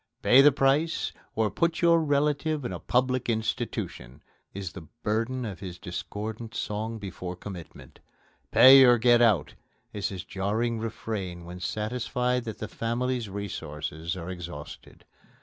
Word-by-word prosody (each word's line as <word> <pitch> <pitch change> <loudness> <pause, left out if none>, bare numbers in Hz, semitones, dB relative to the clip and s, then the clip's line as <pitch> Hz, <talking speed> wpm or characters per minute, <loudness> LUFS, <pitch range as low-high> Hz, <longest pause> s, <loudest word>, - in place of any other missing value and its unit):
"Pay 130 +2 +7
the 145 +1 +7
price 140 +4 +1 0.2
or 110 -1 +1
put 170 +1 0
your 170 -1 +5
relative 150 0 +1
in - - -3
a - - -5
public 130 0 0
institution!" 110 - -3 0.3
is 95 -3 -6
the 80 -4 -10 0.2
burden 115 +4 -1
of 100 -6 -6
his 90 -3 -7
discordant 105 +5 -6
song 110 +2 -3
before 95 -3 -6
commitment. 90 -3 -10 0.5
"Pay 135 +1 +9
or 120 -1 +7
get 120 +1 +5
out!" 105 - +3 0.4
is 105 -2 -2
his 95 -2 -6
jarring 110 +4 -1
refrain 100 -6 -5
when 90 +1 -8
satisfied 125 +5 -1
that 110 -2 -5
the 110 - -5
family's 120 +1 -2
resources 85 -4 -5
are 90 +1 -6
exhausted. 85 -5 -9
110 Hz, 140 wpm, -27 LUFS, 95-125 Hz, 0.5 s, Pay